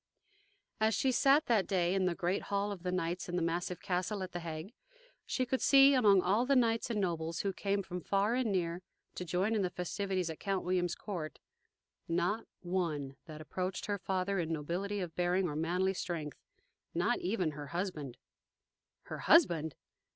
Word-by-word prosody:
As 220 -1 +3
she 260 +5 +2
sat, 275 +4 +4
that 220 -5 +2
day, 180 -2 +1
in 190 -1 +2
the 180 -2 +1
great 180 +3 0
Hall 200 0 0
of 195 -4 -6
the 180 0 -2
Knights 180 0 -2
in 175 - -2
the 180 - +1
massive 175 +2 -2
castle 190 +2 -2
at 185 - -6
The 175 - -4
Hague, 165 +4 -6 0.5
she 255 - 0
could 260 +1 -1
see, 275 0 +7
among 205 -8 +5
all 205 +6 +3
the 275 +2 +2
knights 230 -2 +2
and 225 -3 0
nobles 165 -3 -1
who 195 -1 -1
came 200 +1 -1
from 180 -1 -5
far 200 +5 +1
and 245 -3 +1
near 175 -2 -1 0.3
to - - -5
join 180 +5 0
in 215 - +2
the 185 - +1
festivities 185 +1 -2
at 160 - -9
Count 195 -2 -1
William's 180 -1 +1
court, 170 -7 -5 0.7
not 180 +6 0
one 165 -7 -2
that 155 -1 -8
approached 185 +4 -3
her 205 -1 -2
father 190 +1 -1
in 165 -1 -2
nobility 180 +6 -2
of 170 -3 -5
bearing 180 +1 +1
or 150 - -4
manly 180 +4 +1
strength 165 -6 -4 0.6
not 175 +8 +1
even 180 -4 0
her 145 -1 -7
husband. 160 -7 -4 0.9
Her - - -7
husband? 165 - +4
185 Hz, 185 wpm, -33 LUFS, 170-200 Hz, 0.9 s, see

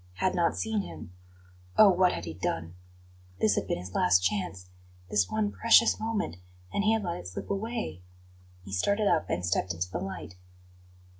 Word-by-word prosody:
Had 185 - 0
not 170 -1 +1
seen 220 -2 0
him 90 - -9 0.6
Oh, 210 -2 +8
what 180 0 +4
had - - -4
he 80 - -5
done? 85 -1 -3 0.7
This 105 - +3
had - - -1
been - - -1
his 90 +1 -8
last 90 0 +4
chance 95 - -2 0.4
this 100 -3 +2
one 215 -1 0
precious 230 +1 +5
moment 220 - -2 0.4
and 200 - +1
he 215 +1 +4
had 220 -1 0
let 175 -2 -2
it 90 - -8
slip 90 - -6
away. 215 - -3 0.6
He 95 - -8
started 200 - +1
up 160 - +2
and 90 - -1
stepped 90 0 0
into 90 +2 -3
the - - -2
light. 95 0 -6
170 Hz, 180 wpm, -29 LUFS, -, 0.7 s, Oh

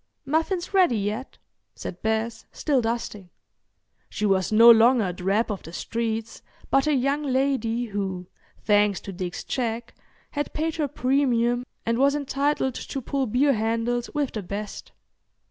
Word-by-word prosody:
"Muffins 325 +6 -1
ready 360 - +4
yet?" 210 +6 -3 0.4
said 180 - -7
Bess, 220 +1 -2
still 280 -5 +1
dusting. 225 -5 -3 0.8
She 210 - -2
was 190 -2 +2
no 230 +2 +9
longer 230 0 +5
a 180 - -2
drab 195 +6 0
of 200 - -4
the 165 - -10
streets 225 +2 -3 0.3
but 275 +2 +3
a 300 - +3
young 275 +3 +1
lady 260 -4 0
who, 195 -4 -3 0.4
thanks 205 -2 +3
to 195 - -7
Dick's 180 -1 -5
check, 235 -2 -3 0.4
had 290 -1 -3
paid 320 +1 -2
her 300 -2 0
premium 250 -3 +1 0.2
and 230 +1 0
was 280 +1 +4
entitled 280 -1 0
to 270 - -5
pull 270 +1 -2
beer 275 +6 +3
handles 230 +2 -1
with 295 -3 -1
the 215 - -4
best. 200 +2 -6
235 Hz, 150 wpm, -25 LUFS, 215-275 Hz, 0.8 s, no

